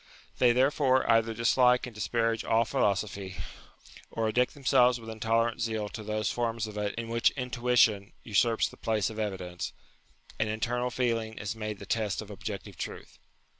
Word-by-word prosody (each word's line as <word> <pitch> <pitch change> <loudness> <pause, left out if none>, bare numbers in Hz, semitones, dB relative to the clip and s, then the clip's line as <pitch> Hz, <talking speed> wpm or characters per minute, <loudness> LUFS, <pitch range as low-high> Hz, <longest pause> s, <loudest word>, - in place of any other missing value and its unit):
They, 125 -1 +6
therefore, 130 +1 +3
either 115 -1 +3
dislike 125 +2 +3
and 125 - -9
disparage 115 +2 0
all 115 +1 +2
philo 110 -5 +2
sophy, 95 -1 -5 0.7
or 115 -1 -1
addict 125 +3 +1
themselves 125 -3 +3
with 115 -1 -8
intolerant 115 +1 0
zeal 110 -2 -2
to 110 - -7
those 110 0 -1
forms 115 -2 -1
of 105 -1 -8
it 105 -1 -2
in 115 0 -4
which 115 0 +3
intuition 120 -5 +2
usurps 115 +1 +2
the - - -13
place 110 -1 0
of 110 - -7
evidence, 95 -4 -4 0.7
and 110 -1 +1
internal 120 +3 -1
feeling 115 -3 -1
is 105 +2 -4
made 110 -1 -4
the 100 - -10
test 105 -1 -1
of 105 -1 -7
objective 100 -3 -7
truth. - - -7
115 Hz, 170 wpm, -29 LUFS, 105-120 Hz, 0.7 s, They